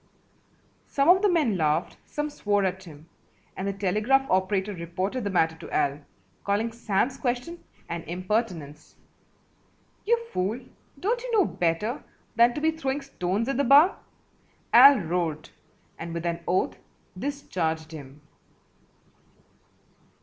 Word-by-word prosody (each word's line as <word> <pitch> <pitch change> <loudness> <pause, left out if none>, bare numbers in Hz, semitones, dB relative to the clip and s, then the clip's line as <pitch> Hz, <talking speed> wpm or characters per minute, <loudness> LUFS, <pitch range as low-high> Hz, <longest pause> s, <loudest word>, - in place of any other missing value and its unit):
Some 280 +3 +1
of 370 +1 +7
the 415 - +4
men 295 - +2
laughed, 155 +1 0
some 295 0 -3
swore 205 -6 0
at 190 0 -3
him, 155 -1 -13 0.5
and 190 - -4
the 200 - -1
telegraph 210 +8 +1
operator 190 +2 +1
reported 185 +8 -3
the 200 - -1
matter 160 -4 +2
to 165 - -10
Al, 140 +1 0 0.4
calling 210 +3 0
Sam's 235 +3 -1
question 255 +7 -3 0.2
an 170 0 -4
impertinence. 180 -4 -3 1.1
"You 470 +3 +3 0.2
fool, 200 +6 -1 0.4
don't 465 - 0
you - - -5
know 410 -5 +4
better 180 - -1 0.3
than 235 +1 +5
to 295 - -3
be 320 +1 +3
throwing 285 -3 -3
stones 215 -5 -2
at 275 - -1
the 280 - +2
bar?" 285 +8 +6 0.7
Al 280 -1 +9
roared, 165 -2 -2 0.5
and 165 0 -6
with 170 0 -4
an 170 0 -1
oath 180 +2 0 0.4
discharged 175 - -3
him. 145 -2 -11
200 Hz, 135 wpm, -26 LUFS, 170-270 Hz, 1.1 s, Al